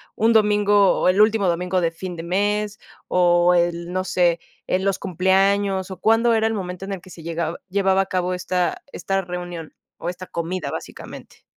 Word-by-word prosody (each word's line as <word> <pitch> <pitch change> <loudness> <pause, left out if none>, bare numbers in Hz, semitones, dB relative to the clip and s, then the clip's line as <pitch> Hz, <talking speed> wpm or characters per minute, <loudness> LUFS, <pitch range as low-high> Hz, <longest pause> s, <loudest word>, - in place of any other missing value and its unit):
un 225 +1 +3
domingo, 205 -2 +4
o - - +2
el 190 +3 +4
último 215 -2 +3
domingo 180 +1 0
de 165 -1 +1
fin 180 +2 -7
de 165 - -7
mes 205 +4 -1 0.3
o 175 0 +4
el, 170 0 0
no 185 0 0
sé, 175 -2 +1 0.3
en 185 +1 0
los 195 -1 +1
cumpleaños 190 +1 +1
o, 185 - -8
¿cuándo 225 +3 +3
era 220 0 +2
el 225 - -1
momento 185 -1 -5
en 195 - -4
el 190 - -6
que 185 - -16
se 170 - -11
llegaba 165 0 -3
llevaba 190 0 +2
a - - -1
cabo 185 -1 -1
esta, 180 0 -1
esta 195 0 -2
reunión, 175 -3 -7 0.2
o 170 - -4
esta 180 +1 -7
comida, 170 +2 -4
básicamente? - - -9
185 Hz, 190 wpm, -22 LUFS, 175-200 Hz, 0.3 s, domingo